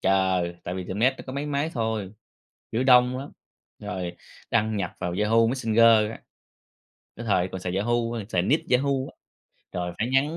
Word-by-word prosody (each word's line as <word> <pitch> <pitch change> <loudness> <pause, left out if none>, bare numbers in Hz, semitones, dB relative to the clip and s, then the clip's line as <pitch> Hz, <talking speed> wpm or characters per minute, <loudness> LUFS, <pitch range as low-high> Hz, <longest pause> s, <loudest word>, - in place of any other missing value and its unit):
chờ, 95 -2 +2 0.2
tại 90 - -4
vì 95 -1 -4
tiệm 95 +2 -5
net 130 +4 +3
nó - - -9
có 130 - -6
mấy 140 +2 -3
máy 145 +2 -1
thôi, 110 -5 -2 0.6
kiểu 120 +4 0
đông 125 0 +5
lắm, 140 +2 -7 0.5
rồi 90 -2 -4 0.4
đăng 110 -1 +1
nhập 90 -4 -2
vào 90 -1 -2
Yahoo 115 +2 +4
Messenger 115 -3 +4
á. - - -9 1.0
Cái 115 - -7
thời 95 -4 +2
còn 95 - -6
xài 90 0 -3
Yahoo, 110 +5 +1 0.3
xài 90 -6 +1
nick 145 - 0
Yahoo 130 +3 +3 0.2
á, - - -28 0.6
rồi 90 -1 -3
phải 115 - 0
nhắn 140 +5 +1
110 Hz, 185 wpm, -25 LUFS, 95-125 Hz, 1.0 s, đông